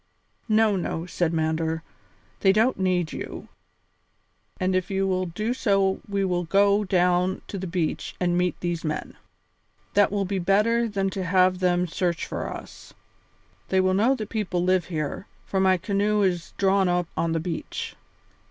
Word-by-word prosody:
"No, 215 -1 +4
no," 170 -2 -3
said 175 -2 -1
Mander, 160 0 -1 0.6
"they 195 - +5
don't 220 +3 +2
need 180 -3 0
you, - - -7 1.1
and 185 0 +1
if 185 -1 0
you 195 0 0
will 185 -1 0
do 215 +8 -2
so 195 -6 +1
we 200 -1 0
will 180 -1 0
go 200 +4 +3
down 180 -1 +1
to 200 - -4
the 190 - -4
beach 170 -2 -2
and 175 -1 +1
meet 180 0 0
these 175 -1 -2
men; 155 -1 -4 0.8
that 205 -1 +4
will 200 -1 0
be 195 0 -2
better 215 +6 +2
than 195 -2 -1
to 190 0 -3
have 185 0 +3
them 180 -1 +2
search 170 0 -1
for - - -4
us. - - -10 0.7
They 190 - +3
will 185 0 +3
know 225 +8 +3
that 215 -4 -6
people 190 -5 -1
live 185 0 +2
here, 155 +1 -4 0.2
for 195 - -1
my 190 -1 +4
canoe 205 +3 +1
is 175 -4 -1
drawn 195 -1 +3
up 175 0 +1
on 165 -1 0
the 165 - 0
beach." 165 0 -4
185 Hz, 170 wpm, -25 LUFS, 175-200 Hz, 1.1 s, they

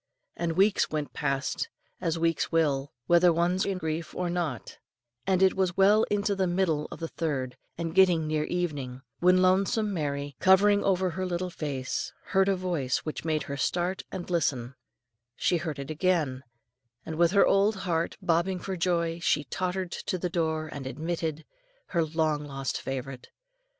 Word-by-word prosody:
And 170 -1 -1
weeks 195 +4 +3
went 150 -2 -3
past, 140 -2 -1 0.3
as 165 0 0
weeks 165 -1 0
will, 145 -4 +1
whether 175 0 +5
one's 175 +3 +1
in 195 -2 -1
grief 160 -1 -4
or 180 -1 -1
not, 160 - -3 0.5
and 190 0 +3
it 190 - +4
was 185 -2 0
well 205 +3 +5
into 205 0 +1
the 190 -1 +1
middle 175 -4 +1
of - - -9
the 165 - -3
third, 140 -7 -3 0.2
and 165 -1 -3
getting 180 -4 +5
near 155 0 0
evening, 140 -8 -3 0.2
when 185 +1 +5
lonesome 195 +3 +2
Mary, 145 -4 -3
cowering 200 +2 +5
over 185 -1 +2
her 185 +3 -3
little 180 0 -2
fire, 145 -6 -4 0.4
heard 195 0 +2
a 195 - +3
voice 175 -9 -1
which 155 - -4
made 155 -2 0
her 140 - -5
start 175 +6 0
and 180 - -5
listen; 130 -7 0 0.6
she 175 - +1
heard 160 -3 -4
it 140 +1 -5
again, 155 -6 +1 0.6
and 160 - -5
with 170 0 +5
her 200 +2 +5
old 200 +2 +3
heart 170 -4 -1
bobbing 175 +1 +1
for 190 +1 -4
joy, 170 -1 0
she 150 -3 +1
tottered 180 +5 -3
to 185 - -3
the 180 0 -2
door 160 -2 0
and 140 -2 -6
admitted 160 +1 -3 0.4
her 170 -2 +2
long 155 -1 0
lost 135 -2 -4
favourite. 135 -1 -5
170 Hz, 170 wpm, -28 LUFS, 150-185 Hz, 0.6 s, whether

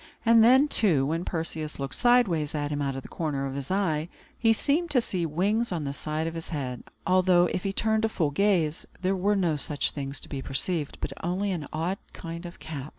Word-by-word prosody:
And 230 -1 +7
then, 260 +5 +6
too, 170 - +3
when 165 +5 -1
Perseus 160 -2 -4
looked 135 -1 -4
sideways 190 -12 +3
at 145 0 -2
him 145 0 -1
out 135 -1 -1
of 135 - -5
the - - -10
corner 145 -4 -2
of 135 - -4
his 140 -1 -5
eye, 170 -5 0 0.3
he 225 -2 +3
seemed 300 +9 +1
to 280 -4 +4
see 180 -7 -2
wings 200 +9 0
on 170 -4 -2
the 140 -1 -3
side 155 +2 -3
of 165 - -3
his 165 -1 -6
head; 130 -6 -4 0.2
although, 180 0 +4
if 180 - -2
he 195 - -1
turned 220 +2 +1
a 225 - +2
full 160 -8 0
gaze, 170 -3 +1
there 190 +1 +1
were 200 +3 +2
no 170 -6 +1
such 145 0 -1
things 140 -1 -5
to - - -11
be 135 -2 -5
perceived, 145 +3 -1
but 135 - -3
only 190 +4 0
an 160 -6 -3
odd 170 +5 -2
kind 170 0 -7
of 170 - -11
cap. 150 -3 -7
165 Hz, 225 wpm, -27 LUFS, 150-195 Hz, 0.3 s, And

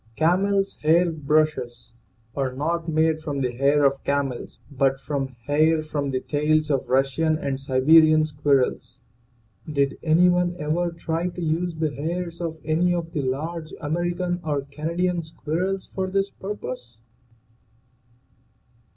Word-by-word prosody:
CAMEL'S 195 +5 +1
HAIR 170 +3 +4
BRUSHES 150 -6 -1 0.4
are 135 -2 -1
not 165 +5 -2
made 160 0 +2
from 145 -3 -3
the 125 -2 0
hair 140 +4 +3
of 135 0 +1
camels 140 -3 -2
but 135 -1 +1
from 140 -1 -2 0.2
hair 155 +2 +3
from 145 -2 -3
the 130 -1 -1
tails 155 +1 +1
of 135 -2 -1
Russian 135 +5 +2
and 140 -3 -3
Sibe 130 -1 -1 0.2
rian 155 0 +4
squirrels. 145 -3 0 0.7
Did 140 -2 0
any 170 +3 +4
one 180 0 +2
ever 170 +3 0
try 170 +1 -2
to 175 0 -6
use 165 +1 -1
the 155 -2 -1
hairs 170 +5 -4
of 165 -2 -3
any 170 +3 +2
of 165 -1 -4
the 150 - -2
large 155 +5 -4
American 175 +3 -1
or 145 -3 -1
Canadian 170 +5 -2
squirrels 170 +4 -3
for 190 -1 -1
this 195 +1 0
purpose? 125 - -7
155 Hz, 140 wpm, -24 LUFS, 140-170 Hz, 0.7 s, HAIR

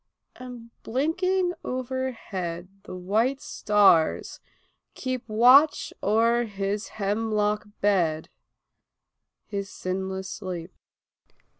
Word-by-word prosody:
And 245 -2 -10
blinking 355 +8 0
overhead 235 -9 -4 0.2
the - - -7
white 220 +9 0
stars 205 - +2 0.6
keep 255 -1 -3
Watch 255 +8 +5
o'er 230 +3 +3
his 200 0 -3
hemlock 210 0 0
bed 170 -6 +1 1.2
his 200 -2 -4
sinless 190 +1 -4
sleep. 185 -3 -6
210 Hz, 80 wpm, -26 LUFS, 190-250 Hz, 1.2 s, Watch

